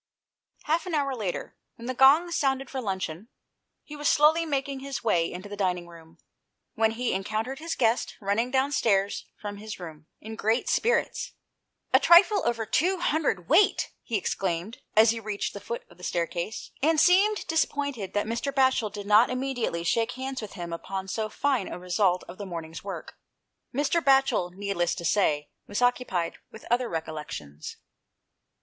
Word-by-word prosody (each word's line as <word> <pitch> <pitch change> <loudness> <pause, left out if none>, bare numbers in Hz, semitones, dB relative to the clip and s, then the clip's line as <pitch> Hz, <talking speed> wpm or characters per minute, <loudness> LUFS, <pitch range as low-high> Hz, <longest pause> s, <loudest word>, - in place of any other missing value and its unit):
Half 325 +4 0
an 345 - -1
hour 280 -2 0
later, 200 -7 -4 0.2
when 230 - -11
the 255 - -2
gong 285 +7 +6
sounded 270 -4 0
for 265 - -3
luncheon, 190 -2 -4 0.6
he 300 - -10
was 295 0 0
slowly 320 +2 +4
making 275 -2 -2
his 275 -1 -5
way 170 -7 +2
into 185 +3 -7
the 205 - -7
dining 180 -3 -1
room, 165 -1 -15 0.6
when 220 0 +2
he 245 +1 -1
encountered 215 +7 -2
his 330 +1 -3
guest 230 -1 +1
running 210 +4 0
downstairs 240 -7 +1
from 205 -1 -6
his 215 0 -8
room, 155 -3 -10
in 220 +1 -8
great 220 +2 0
spirits. 475 - 0 0.3
" - - -44
A - - +8
trifle 390 +4 +6
over 230 -2 0
two 355 - +1
hundred 295 - 0
weight! 360 +7 +4
" - - -51
he 225 - -2
exclaimed, 190 +2 -2 0.2
as 220 +1 +7
he 230 - -3
reached 210 -2 -3
the 200 - -6
foot 230 +4 -6
of - - -20
the - - -14
staircase, 170 +4 -3
and 315 +2 +3
seemed 390 +6 +4
disappointed 285 - -1
that 205 - +1
Mr. 235 +5 -2
Batchel 260 -5 +2
did 205 0 -7
not 210 +3 +5
immediately 255 -9 -2
shake 225 +6 +1
hands 260 0 -4
with 215 - -8
him 175 -3 -6
upon 190 +3 -5
so 215 +2 -2
fine 265 -5 0
a - - -6
result 180 0 +1
of 180 +3 -11
the 200 - -5
morning's 165 -2 -7
work. 195 -1 -7 0.5
Mr. 295 +5 +1
Batchel, 270 -10 +3
needless 195 -3 -1
to 170 - -6
say, 150 -6 +1 0.2
was 205 - -2
occupied 245 -9 0
with 220 - -13
other 240 0 +2
recollections. 150 - -6
220 Hz, 175 wpm, -27 LUFS, 185-270 Hz, 0.6 s, A